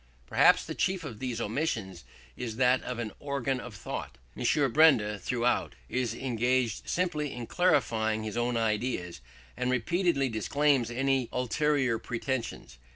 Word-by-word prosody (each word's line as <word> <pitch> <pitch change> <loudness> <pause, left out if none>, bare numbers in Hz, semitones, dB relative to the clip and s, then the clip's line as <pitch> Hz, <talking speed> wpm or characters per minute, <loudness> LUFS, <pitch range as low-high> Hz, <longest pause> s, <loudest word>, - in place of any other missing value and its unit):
Perhaps - - +4
the - - -5
chief 185 -1 0
of 120 -8 -7
these 125 -3 -3
omissions 110 - -2 0.3
is 120 -3 -5
that 125 +1 +3
of 125 - -5
an 115 -3 -3
organ 135 -2 -2
for 125 - -7
thought. 105 -4 -6 0.2
M. 140 -5 +1
Benda 110 -10 +5
throughout 120 +4 0
is 125 -3 -1
engaged 125 -2 0
simply 155 -5 -1
in 120 -1 -6
clarifying 115 -11 +1
his 110 0 -5
own 120 0 0
ideas, 110 - -1 0.3
and 125 - -1
repeatedly 140 +3 +1
disclaims 130 +3 +1
any 130 0 0
ulterior 125 0 +1
pretensions. 120 - -4
125 Hz, 140 wpm, -29 LUFS, 115-140 Hz, 0.3 s, Benda